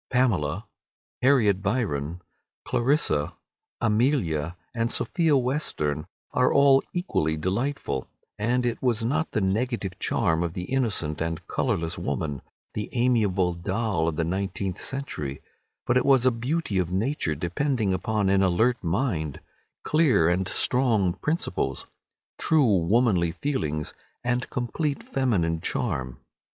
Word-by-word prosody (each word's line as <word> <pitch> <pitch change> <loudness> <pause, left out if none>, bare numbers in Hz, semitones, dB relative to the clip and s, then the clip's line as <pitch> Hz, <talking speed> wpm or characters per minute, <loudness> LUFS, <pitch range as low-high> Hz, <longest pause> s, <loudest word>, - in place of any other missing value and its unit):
Pamela, 105 - +1 0.6
Harriet 115 -8 +4
Byron, 90 - -1 0.4
Clarissa, 120 - +1 0.4
Amelia, 105 - +1 0.2
and 115 0 0
Sophia 160 -5 +2
Western 90 - -1 0.3
were 125 0 +3
all 140 -1 +6
equally 80 - 0
delightful, 95 - -2 0.3
and 120 +4 +1
it 120 - -1
was 120 -3 +1
not 155 +7 0
the 110 - -1
negative 100 -1 -1
charm 80 0 +1
of 85 -1 -2
the 90 - -4
innocent 100 - 0
and 80 0 -3
colourless 85 +1 -1
woman, 70 -2 -2 0.3
the 105 - -4
amiable 105 -8 +2
doll 95 -1 -1
of 80 - -1
the 85 - 0
nineteenth 95 +1 -3
century, 75 - -4 0.5
but 120 - +3
it 125 - +3
was 135 -3 +4
a 130 - +6
beauty 120 - -1
of 90 -1 -1
nature 95 - 0
depending 100 - 0
upon 105 +2 0
an 95 0 +4
alert 110 +7 +2
mind, 85 - -1 0.4
clear 150 - +3
and 90 +2 +1
strong 110 -4 +1
principles, 150 - -2 0.5
true 135 -11 +4
womanly 100 -7 +3
feelings, 80 - -2 0.3
and 120 +1 -1
complete 140 +4 -2
feminine 90 -12 0
charm. 65 -2 -2
105 Hz, 125 wpm, -26 LUFS, 85-125 Hz, 0.6 s, all